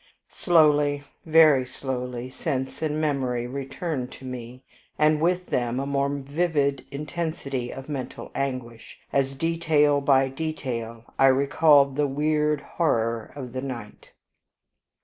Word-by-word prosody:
Slowly, 150 -4 +3 0.2
very 155 -4 +6
slowly, 125 -1 -5
sense 130 +1 -3
and 155 -1 -1
memory 130 -6 0
returned 135 +1 -4
to 130 - -11
me, 125 0 -8 0.3
and 155 0 +3
with 180 +2 +1
them 120 -3 -1
a 135 - -2
more 140 0 0
vivid 145 0 0
intensity 140 -4 -4
of 135 0 -8
mental 140 -4 -6
anguish, 130 -4 -4 0.2
as 135 0 +1
detail 155 -2 +2
by 135 -1 +4
detail 130 -6 -4 0.2
I 135 - +7
recalled 140 +1 +4
the 145 -1 +2
weird 150 +1 +1
horror 115 -8 -1
of 130 -4 -7
the 130 - -3
night. 120 -6 -8
140 Hz, 125 wpm, -25 LUFS, 130-150 Hz, 0.3 s, I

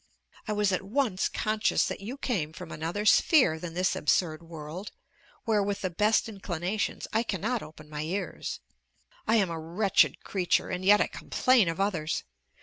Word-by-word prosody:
I 215 - 0
was 205 -1 +2
at 185 - 0
once 210 -1 0
conscious 215 0 +1
that - - -4
you 225 +7 -6
came 180 - -2
from - - -9
another 170 +7 -3
sphere 215 - +5
than 165 0 -7
this 185 +1 +1
absurd 155 +1 +1
world, 165 +3 -8 0.5
where, 215 -2 +2
with 200 0 -2
the 185 - -2
best 210 +7 +2
inclinations, 195 -1 -3
I 220 - +3
cannot 225 +2 -2
open 155 0 -12
my 150 -1 -5
ears. 180 +6 -4 0.7
I 225 - +4
am 195 -6 +2
a 165 - -4
wretched 180 +6 +2
creature, 185 -3 0
and 180 - -3
yet 205 +2 +6
I - - +4
complain 250 -8 +2
of 165 - -4
others!! 175 -6 -1
195 Hz, 170 wpm, -28 LUFS, 165-215 Hz, 0.7 s, yet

